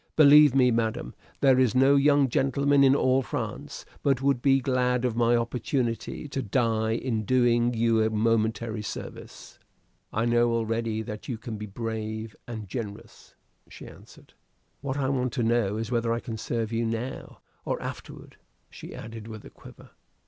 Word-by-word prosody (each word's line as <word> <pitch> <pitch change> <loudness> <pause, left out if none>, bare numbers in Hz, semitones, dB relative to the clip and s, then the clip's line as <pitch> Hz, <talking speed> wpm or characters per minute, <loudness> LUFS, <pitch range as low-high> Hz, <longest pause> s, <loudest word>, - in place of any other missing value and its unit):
Believe 150 -2 +7
me, 125 -2 +4
madam, 115 -1 -2 0.3
there 135 -2 +5
is 130 -2 +2
no 135 +2 +5
young 140 0 +4
gentleman 140 +2 +2
in 135 0 +5
all 130 -1 +2
France 110 - -6 0.2
but 135 -3 +2
would 135 -2 +1
be 135 0 +4
glad 125 -1 0
of 120 -3 -1
my 120 0 +3
opportunity, 120 +3 -2
to 135 - -3
die 110 -1 0
in 115 -2 -2
doing 120 0 +2
you 115 0 +2
a 110 - +2
momentary 110 0 0
service." 105 - -9 0.5
"I 110 +2 0
know 120 0 +2
already 115 -1 -1
that 105 0 -8
you 120 - -3
can 115 -1 -7
be 105 +1 -7
very 100 - -18
brave 110 -1 -4
and 110 -3 -7
generous," 105 0 -8 0.3
she - - -11
answered. - - -16 0.5
"What 135 0 -4
I 135 -2 0
want 130 -2 -1
to 125 - -1
know 115 -3 +1
is 115 +1 -4
whether 115 -1 0
I 115 - 0
can 115 -1 -6
serve 115 0 -3
you 115 +1 0
now 115 +3 -5 0.2
or - - -2
afterward," - - -9 0.3
she - - -10
added, 110 -1 -9
with 110 -2 -9
a - - -12
quaver. - - -15
120 Hz, 170 wpm, -26 LUFS, 110-130 Hz, 0.5 s, Believe